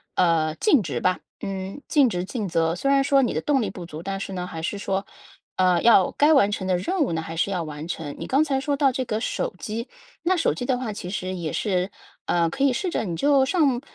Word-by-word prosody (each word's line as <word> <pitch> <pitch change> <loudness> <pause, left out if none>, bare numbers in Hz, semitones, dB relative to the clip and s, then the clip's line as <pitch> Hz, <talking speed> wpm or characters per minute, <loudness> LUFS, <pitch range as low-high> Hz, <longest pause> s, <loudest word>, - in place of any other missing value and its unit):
呃， 165 -3 +2
尽 300 - +3
职 160 - -3
吧。 185 0 +1 0.2
嗯， 195 +6 -5
尽 280 -6 +4
职 180 -3 -2
尽 210 0 -4
责， 165 -1 +1
虽 275 +10 -1
然 275 0 +4
说 275 0 +4
你 250 - 0
的 - - -1
动 275 -4 +2
力 210 - -1
不 180 -2 -8
足， 155 -1 -8
但 195 +2 -4
是 195 - -5
呢 180 -1 -4
还 160 -2 -6
是 195 +5 -3
说， 195 0 -2 0.5
呃， 180 -2 +4
要 225 -6 +6
该 295 +2 +4
完 265 -9 +5
成 200 -2 -3
的 185 - +2
任 340 - -1
务 270 - +1
呢， 160 - -1
还 165 0 -7
是 190 +4 0
要 180 -3 -1
完 150 0 -7
成。 155 -4 -5
你 - - -6
刚 275 +4 +3
才 275 -3 0
说 285 +1 0
到 275 -2 +4
这 260 - -1
个 215 -1 -2
手 225 - -2
机， 230 +3 -4 0.4
那 370 +2 +3
手 325 - +2
机 245 - -5
的 255 0 +1
话 225 -5 -3
其 180 -3 -6
实 185 -1 -3
也 165 -4 -4
是， 185 -2 0 0.4
呃， 170 -1 +2
可 270 - -2
以 275 - +5
试 365 - -1
着 335 - -1
你 175 -5 -3
就 280 -2 +4
上 275 -6 +2
195 Hz, 275 characters per minute, -24 LUFS, 175-270 Hz, 0.5 s, 要